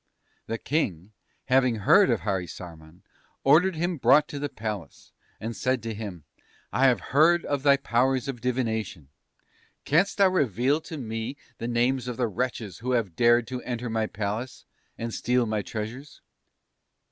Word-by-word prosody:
"The 115 - -2
King, 105 - -2 0.3
having 130 -2 +3
heard 105 - +5
of - - +1
Harisarman, 90 -4 -6 0.4
ordered 165 +6 +5
him 175 +2 -1
brought 140 +4 +5
to 145 - -5
the 145 0 -3
Palace, 105 - -6 0.3
and 115 +1 -5
said 130 +4 -1
to 115 -1 -3
him: 100 -7 -7 0.5
"'I 130 +5 +3
have 125 -5 +3
heard 170 +4 +5
of 145 -2 -1
thy 140 0 +5
powers 130 0 +1
of 125 -4 -5
divination; 110 - -2 0.8
canst 175 +7 +2
thou 195 -2 +5
reveal 140 - +1
to 160 - -8
me 115 +1 -4 0.2
the 115 - -3
names 120 +2 +1
of 125 - -4
the 125 -2 +1
wretches 115 -2 -4
who 125 +2 -2
have 105 -9 0
dared 120 0 +4
to 125 -1 -4
enter 120 -1 -4
my 110 -1 0
palace, 110 +5 -4 0.3
and 115 0 -4
steal 125 0 +1
my 110 -1 -1
treasures?' 115 +8 -7
120 Hz, 160 wpm, -26 LUFS, 110-135 Hz, 0.8 s, heard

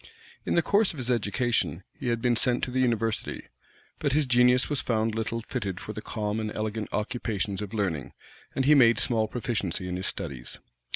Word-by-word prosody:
In - - +1
the 170 - +4
course 205 +2 +3
of - - -11
his 125 -1 0
education, 105 - 0
he - - -6
had 115 -1 0
been 120 -1 +3
sent 120 +1 +2
to 125 - -1
the 130 - 0
university; 115 -3 0 0.6
but 145 -3 0
his 150 0 +3
genius 125 0 +4
was 145 -2 0
found 110 -1 0
little 115 +1 -2
fitted 100 -8 -3
for 105 - -6
the 110 - -6
calm 105 0 -2
and 110 -1 -3
elegant 110 0 -3
occupations 105 -3 -2
of 105 -2 -5
learning; 90 - -2 0.4
and 135 - +1
he 150 - +7
made 120 -5 +6
small 115 -3 +2
proficiency 105 -7 -2
in 90 0 -3
his 95 - -2
studies. 65 -2 -5
115 Hz, 195 wpm, -27 LUFS, 105-125 Hz, 0.6 s, he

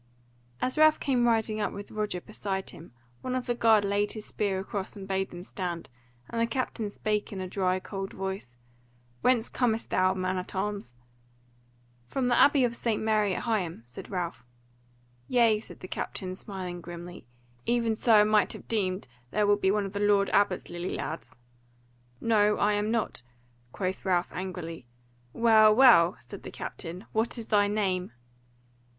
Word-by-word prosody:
As 255 +4 -1
Ralph 310 0 +6
came 250 -4 +2
riding 220 -2 +1
up 205 - 0
with 200 +1 -8
Roger 210 -4 -2
beside 195 -2 -4
him, 165 - -13 0.3
one 255 0 -2
of 255 -1 -2
the 240 - 0
guard 220 -3 +4
laid 205 +1 +1
his 215 -1 -7
spear 200 -3 -1
across 195 0 -5
and 195 -2 -8
bade 190 0 -1
them 175 0 -9
stand, 175 -6 -5 0.4
and 230 - -2
the 230 - +3
captain 230 -3 -2
spake 210 0 -2
in 195 - -5
a 185 - -3
dry 185 0 0
cold 195 0 -5
voice: 190 -11 -5 0.6
"Whence 245 -3 +3
comest 230 -3 0
thou, 185 0 +3
man 185 0 -1
at 180 - -8
arms?" 200 -10 -3 1.1
"From 250 - 0
the 245 - +4
Abbey 280 -2 +6
of 235 -1 +1
St. 230 -2 0
Mary 215 -3 +2
at - - -4
Higham," 185 - -1
said 120 +1 -10
Ralph. 180 -6 -3 0.8
"Yea," 230 -3 +4
said - - -13
the 185 - -7
captain, 185 0 -4
smiling 185 -2 -6
grimly, 175 -4 -9 0.4
"even 235 -2 +2
so 215 -1 +5
I - - +6
might 210 0 +3
have - - -11
deemed: 190 - -1 0.2
thou 210 +7 +1
wilt 205 0 +3
be 190 - +3
one 205 0 +1
of 195 - -6
the 200 - -2
Lord 205 -1 +3
Abbot's 200 -3 +2
lily 175 +1 -4
lads." 160 - -5 0.8
"No 210 -2 +3
I 210 +1 +3
am 205 +1 0
not," 225 - -1 0.5
quoth 185 +5 -3
Ralph 180 -2 +1
angrily. 170 -7 -6 0.4
"Well, 220 - +6
well," 215 -9 +7
said - - -10
the - - -8
captain, 180 +4 -7
"what 225 +3 0
is 230 -1 -6
thy 205 -1 +4
name?" 190 - -1
205 Hz, 175 wpm, -28 LUFS, 185-220 Hz, 1.1 s, well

